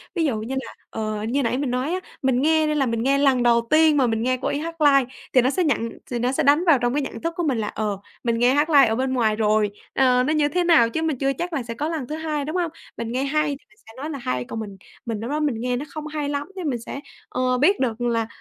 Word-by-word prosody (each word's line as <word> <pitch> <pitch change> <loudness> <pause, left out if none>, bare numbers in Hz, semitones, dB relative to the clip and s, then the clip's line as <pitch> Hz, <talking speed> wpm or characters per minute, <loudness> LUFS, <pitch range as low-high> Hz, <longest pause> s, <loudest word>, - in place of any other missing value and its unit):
Ví 335 -2 +1
dụ 270 -6 0
như 250 +5 -4
là, - - -10 0.2
ờ, 215 -1 -3
như 255 +5 0
nãy 240 +2 0
mình 275 -2 -1
nói 255 +7 -1
á, 370 - -1 0.2
mình 260 -2 +2
nghe 315 +1 +3
nên 305 0 0
là 275 - +2
mình 230 -2 -1
nghe 275 +2 +3
lần 270 -3 +3
đầu 235 -1 +3
tiên 310 -1 +5
mà 260 -3 +3
mình 225 -1 -1
nghe 255 +1 +1
cô - - -1
ấy - - -1
hát 330 +1 -6
live 275 -3 +5 0.3
thì 255 - +6
nó 255 - +2
sẽ 365 +5 0
nhận 270 -7 0 0.2
thì 240 - -1
nó 245 +2 +1
sẽ - - 0
đánh 290 +4 +4
vào 320 -4 +6
trong 240 +1 +1
cái 295 - +1
nhận 270 - -6
thức 335 0 -2
của 345 - 0
mình 275 -6 0
là, 215 -2 -2
ờ, 205 -2 -3 0.2
mình 235 -1 0
nghe 245 +2 +4
hát 295 +3 +2
live 280 -5 +6
ở 220 - 0
bên 260 +2 -1
ngoài 225 -4 +2
rồi, 215 -1 +2 0.2
ờ, 250 -1 +3
nó 300 +4 +1
như 300 -1 +3
thế 360 +4 0
nào 325 -10 +5
chứ 320 - -2
mình 320 -4 -1
chưa 275 +2 0
chắc 345 +6 -4
là 275 -5 -1
sẽ 230 0 -6
có 290 +7 -3
lần 310 -7 -3
thứ 305 - -4
hai, 310 -2 -3
đúng 310 +5 -4
không? 345 -3 0 0.3
Mình 230 0 -4
nghe 255 +2 -1
hay 305 +2 +1
thì 280 0 -6
mình 210 - -26
sẽ 225 - -13
nói 290 +4 -5
là 295 - -4
hay 125 - -2
còn 225 - -6
mình 200 -3 -7 0.3
mình 225 -2 -3
lúc 230 +3 -5
đó 300 - 0
mình 295 -6 0
nghe 250 0 0
nó 265 +4 -4
hông 305 0 -5
hay 300 -2 -3
lắm 285 0 -3
chứ 375 - -5
mình 255 -5 -1
sẽ, 275 - -6 0.3
ờ, 255 0 0
biết 350 +10 +3
được 245 -3 -1
là, 230 -2 0
265 Hz, 310 wpm, -23 LUFS, 235-300 Hz, 0.3 s, thì